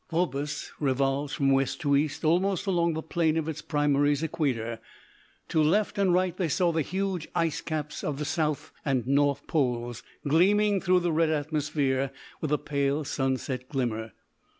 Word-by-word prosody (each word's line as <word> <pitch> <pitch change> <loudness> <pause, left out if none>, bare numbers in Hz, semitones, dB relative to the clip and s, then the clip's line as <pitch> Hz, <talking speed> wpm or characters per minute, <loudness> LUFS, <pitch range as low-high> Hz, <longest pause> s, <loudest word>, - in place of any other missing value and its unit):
Phobos 150 -4 -2
revolves 140 +1 0
from 135 -1 +2
west 135 0 +1
to 145 -2 +2
east 145 +2 0
almost 180 +4 +2
along 170 -4 +1
the 160 - -3
plane 160 -1 +1
of 160 -1 -1
its 155 -1 -4
primary's 145 0 +1
equator. 120 -8 -1 0.7
To 160 - +2
left 200 +7 +2
and 195 -2 +3
right 180 0 +2
they 180 -2 0
saw 175 +3 +2
the 160 -1 +1
huge 190 0 -2
ice 165 -1 0
caps 150 -2 -4
of 145 -2 -2
the 150 - -3
South 155 0 -1
and 130 -5 0
North 140 +1 +2
Poles 120 -5 -1 0.3
gleaming 200 +6 +4
through 185 -1 +3
the 175 -1 0
red 160 0 +2
atmosphere 145 -3 0 0.3
with 155 - -2
a 150 - +4
pale 140 +1 -1
sunset 130 -2 -2
glimmer. 115 -5 -2
150 Hz, 165 wpm, -27 LUFS, 140-165 Hz, 0.7 s, gleaming